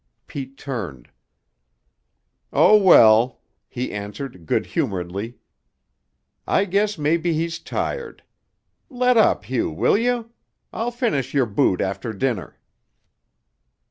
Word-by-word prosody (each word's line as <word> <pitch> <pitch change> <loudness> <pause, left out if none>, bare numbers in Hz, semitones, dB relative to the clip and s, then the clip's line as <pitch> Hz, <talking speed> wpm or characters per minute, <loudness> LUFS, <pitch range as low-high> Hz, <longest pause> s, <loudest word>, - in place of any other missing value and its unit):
Pete 135 -1 -8
turned. 95 - -6 1.4
"Oh, 215 - +6
well," 125 - +6 0.3
he 125 0 -4
answered 105 - -7
good - - 0
humoredly, 100 +5 -3 1.1
"I 200 - +2
guess 205 +2 0
maybe 165 +3 +1
he's 165 +1 -2
tired. 470 -2 -5 0.7
Let 250 -2 +2
up, 220 - +3
Hugh, 130 -2 -1
will 80 - +1
you? 240 -1 -1 0.4
I'll 230 +2 -2
finish 230 - -2
your 135 -3 +3
boot 100 -3 +1
after 100 +4 -3
dinner." 110 -3 -3
135 Hz, 105 wpm, -22 LUFS, -, 1.4 s, Oh